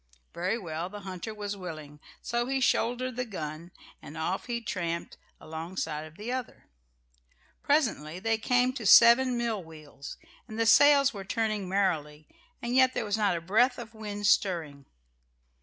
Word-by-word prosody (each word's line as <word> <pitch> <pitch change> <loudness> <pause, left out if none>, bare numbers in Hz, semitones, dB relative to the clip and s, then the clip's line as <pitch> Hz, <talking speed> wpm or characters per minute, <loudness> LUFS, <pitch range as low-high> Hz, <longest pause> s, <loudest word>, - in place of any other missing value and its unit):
Very 185 +6 -1
well; 170 -3 -5
the 205 +1 -9
hunter 190 +2 -6
was 205 -1 -5
willing. 155 -6 -9 0.2
So 240 0 -1
he 270 0 0
shouldered 250 0 0
the 250 - 0
gun 165 -6 -7 0.3
and 150 - -10
off 180 +7 -2
he 240 -1 -2
tramped 170 -7 -4 0.2
alongside 160 -1 -5
of 155 +2 -17
the 215 +4 -5
other. 255 -2 -5 1.0
Presently 225 - 0
they 225 +3 0
came 250 +2 +2
to 240 -4 -6
seven 240 +3 +7
mill 230 -5 -2
wheels, 155 -3 -11 0.3
and 220 -2 -8
the 230 - +1
sails 280 +3 +6
were 200 -2 -7
turning 215 -2 -2
merrily, 155 -6 -1 0.4
and 240 +1 -2
yet 260 0 +4
there - - -1
was 205 -1 0
not 205 -5 +1
a - - -6
breath 230 +9 +2
of 235 -1 -9
wind 205 -2 -6
stirring. 160 -9 +1
205 Hz, 160 wpm, -28 LUFS, 165-235 Hz, 1.0 s, seven